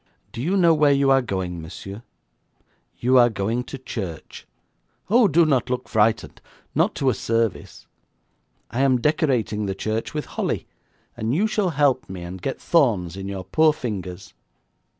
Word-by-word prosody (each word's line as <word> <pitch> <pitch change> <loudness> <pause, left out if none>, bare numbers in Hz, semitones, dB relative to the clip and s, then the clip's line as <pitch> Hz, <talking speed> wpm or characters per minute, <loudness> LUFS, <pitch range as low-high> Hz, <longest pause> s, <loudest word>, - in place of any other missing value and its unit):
'Do 115 - -6
you 180 +9 +1
know 170 -3 +5
where 150 -2 +4
you 140 -1 +3
are 135 0 +5
going, 95 -7 -4
monsieur? 95 +6 -9 1.0
You 125 +1 +4
are 120 0 +6
going 110 +3 -2
to - - -7
church. 100 -11 -7 0.6
Oh, 235 -1 +6
do 170 0 +4
not 130 -5 +1
look 125 0 -2
frightened, 110 0 +1 0.3
not - - +1
to 135 -1 +2
a - - -1
service. 115 -2 -2 0.9
I 120 - -3
am 130 -2 +3
decorating 125 - 0
the 95 - -2
church 110 +3 -3
with 150 - -2
holly, - - -3 0.5
and 110 +4 -1
you 200 +7 +2
shall 215 -3 0
help 140 - +1
me 90 -2 -7
and 90 +1 -8
get 135 - -3
thorns 110 - +2
in 95 0 -6
your 95 -1 -5
poor 155 +11 +3
fingers.' 95 - -6
120 Hz, 165 wpm, -23 LUFS, 100-145 Hz, 1.0 s, are